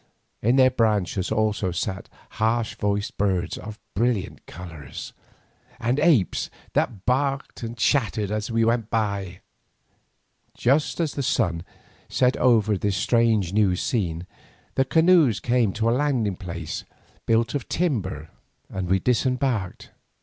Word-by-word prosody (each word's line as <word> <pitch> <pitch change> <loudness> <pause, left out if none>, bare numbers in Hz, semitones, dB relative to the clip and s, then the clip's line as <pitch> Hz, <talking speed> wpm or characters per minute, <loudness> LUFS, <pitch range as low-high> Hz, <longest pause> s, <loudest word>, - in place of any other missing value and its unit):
In 120 +4 +3
their 130 -1 +6
branches 105 -6 0
also 110 -3 +1
sat 95 +2 -4 0.3
harsh 115 +1 +1
voiced 100 0 -2
birds 95 -3 0
of 110 0 -8 0.2
brilliant 115 -1 -1
colours, 80 -6 -9 0.7
and 120 +4 0
apes 150 - +2 0.2
that 105 -6 -1
barked 135 +2 -1
and 115 0 -6
chattered 110 -5 +1
at 105 - 0
us 105 - -3
as - - -7
we 115 0 +2
went. 115 -1 +1 1.7
Just 140 +7 +1
as 160 -4 0
the 140 - -3
sun 95 -10 0 0.5
set 125 0 +2
over 115 -4 +3
all 100 - -1
this 100 0 0
strange 110 -7 +2
new 100 -3 +3
scene 90 -5 -2 0.5
the 135 - +2
canoes 160 - +4
came 120 -4 +2
to 110 0 -1
a - - +4
landing 125 -7 +1
place 85 -3 -6 0.4
built 115 0 +2
of 145 -3 -4
timber, 95 - -2 0.4
and 95 -2 -4
we 95 - +4
disembarked. 125 -3 -1
110 Hz, 135 wpm, -24 LUFS, 95-125 Hz, 1.7 s, their